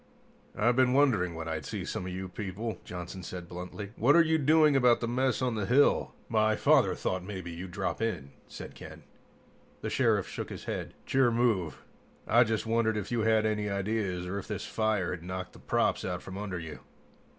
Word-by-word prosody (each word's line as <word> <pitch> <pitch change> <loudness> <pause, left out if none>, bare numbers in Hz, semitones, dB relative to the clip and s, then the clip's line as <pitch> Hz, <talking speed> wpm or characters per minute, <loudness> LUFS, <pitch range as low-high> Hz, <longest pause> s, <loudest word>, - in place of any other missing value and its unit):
"I've 120 +3 +3
been 130 0 +4
wondering 110 -12 +3
when 80 0 -5
I'd 80 -1 -3
see - - -5
some 90 - -4
of - - -4
you 95 +1 -4
people," 105 +4 -5
Johnson 90 +1 -7
said 90 0 -7
bluntly. 90 +4 -7
"What 130 +6 +4
are 170 - +7
you 160 0 +2
doing 155 0 +5
about 125 -3 +5
the 115 - -2
mess 130 +2 0
on 125 -2 +1
the 105 -3 -2
hill?" 135 +4 +3
"My 110 -1 +2
father - - +4
thought 95 -1 -2
maybe 95 -3 -6
you'd 90 +3 -7
drop 95 +3 -3
in," 85 -12 -2 0.2
said - - -9
Ken. - - -11 0.8
The - - -3
Sheriff - - +2
shook - - -5
his - - -7
head. - - -5
"It's - - -7
your 130 -2 +5
move. 110 - 0 0.4
I 120 - +6
just 110 -1 -1
wondered 110 -1 +1
if 105 +1 -4
you 120 - +1
had 110 0 +3
any 105 -1 0
ideas, 100 -2 -1
or 95 +3 -3
if - - -9
this - - -4
fire 110 -4 0
had 90 - -5
knocked 90 +1 -6
the - - -14
props - - +1
out 90 -1 -3
from 95 - -8
under 95 -2 -4
you." 80 -3 -7
105 Hz, 205 wpm, -30 LUFS, 90-120 Hz, 0.8 s, are